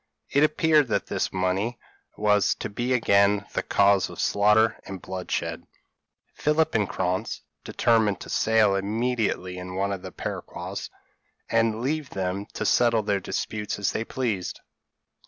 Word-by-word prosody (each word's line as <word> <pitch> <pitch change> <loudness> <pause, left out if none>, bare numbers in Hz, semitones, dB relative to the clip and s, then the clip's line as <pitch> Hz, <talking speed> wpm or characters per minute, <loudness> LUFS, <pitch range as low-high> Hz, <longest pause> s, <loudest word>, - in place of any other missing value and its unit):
It 140 - +4
appeared 155 -1 +3
that - - 0
this - - -2
money 95 +6 -1 0.4
was 105 -1 +3
to - - -5
be 120 +5 -2
again 100 -4 +3
the - - 0
cause 100 -1 +3
of - - -10
slaughter 105 +2 +3
and 95 -1 -7
bloodshed. 90 0 -4 0.7
Philip 150 +1 +1
and 105 -4 +1
Krantz 90 0 -2 0.2
determined 110 -5 +2
to - - -9
sail 110 -2 +3
immediately 105 -2 -1
in 90 0 -7
one 100 +1 0
of 95 -2 -4
the - - -8
peroquas, - - -6 0.6
and 115 -1 +2
leave 145 +2 -2
them 95 +1 -3
to - - -2
settle 115 -2 +3
their 100 -1 0
disputes 105 +2 -3
as 100 - 0
they 110 - -2
pleased. 115 -7 -3
105 Hz, 145 wpm, -25 LUFS, 95-115 Hz, 0.7 s, It